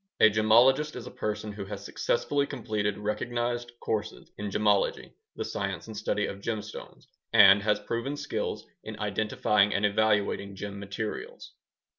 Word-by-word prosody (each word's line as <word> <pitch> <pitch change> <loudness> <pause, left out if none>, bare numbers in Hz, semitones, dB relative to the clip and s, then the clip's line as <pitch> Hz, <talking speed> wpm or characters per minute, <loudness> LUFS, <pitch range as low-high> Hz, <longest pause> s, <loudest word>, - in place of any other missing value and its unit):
A 110 - +7
gemologist 120 +8 +4
is 120 - -7
a 125 - -8
person 105 0 -3
who 100 -1 -6
has 100 0 -7
successfully 140 +7 0
completed 105 -6 -2
recognized 120 +3 -2
courses 110 -2 -3
in 105 0 -3
gemology 105 0 +1 0.2
(the - - -3
science - - -3
and 110 - -9
study 105 0 -1
of 100 - -6
gemstones) 110 -1 -6 0.3
and 100 0 +8
has 105 0 +1
proven 120 +7 -3
skills 145 0 -3 0.2
in - - -7
identifying 105 -1 +1
and 100 - +2
evaluating 105 -1 +1
gem 100 +1 -6
materials. 100 +2 -6
105 Hz, 145 wpm, -28 LUFS, 100-120 Hz, 0.3 s, and